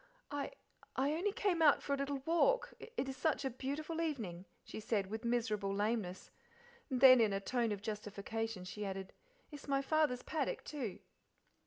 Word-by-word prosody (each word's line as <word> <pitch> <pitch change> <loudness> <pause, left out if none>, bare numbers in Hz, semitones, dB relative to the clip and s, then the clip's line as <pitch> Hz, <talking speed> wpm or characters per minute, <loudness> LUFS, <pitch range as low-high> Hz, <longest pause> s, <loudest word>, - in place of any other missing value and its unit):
"I 290 - -3 0.4
I 275 +3 +2
only 365 +6 +1
came 385 -4 +1
out 300 -3 +6
for 280 - -1
a - - +4
little 275 -1 -2
walk; 485 +9 +3
it 465 - -4
is 265 - -4
such 295 -1 0
a 265 - 0
beautiful 295 +6 -3
evening," 215 - -3 0.2
she - - -7
said, 205 -3 -1
with 220 +2 -4
miserable 225 -4 0
lameness; 205 -2 -1 0.6
and 255 -3 -1
then 255 -2 +10
in 215 -3 +3
a 195 - +1
tone 235 +2 0
of 205 -1 -3
justification 215 0 -3
she 210 +3 -5
added, 195 -1 -4 0.4
"it's 295 -1 -9
my 275 -1 +1
father's 295 -4 +2
paddock, 305 -4 -2
too." 255 -10 -4
255 Hz, 175 wpm, -36 LUFS, 210-295 Hz, 0.6 s, then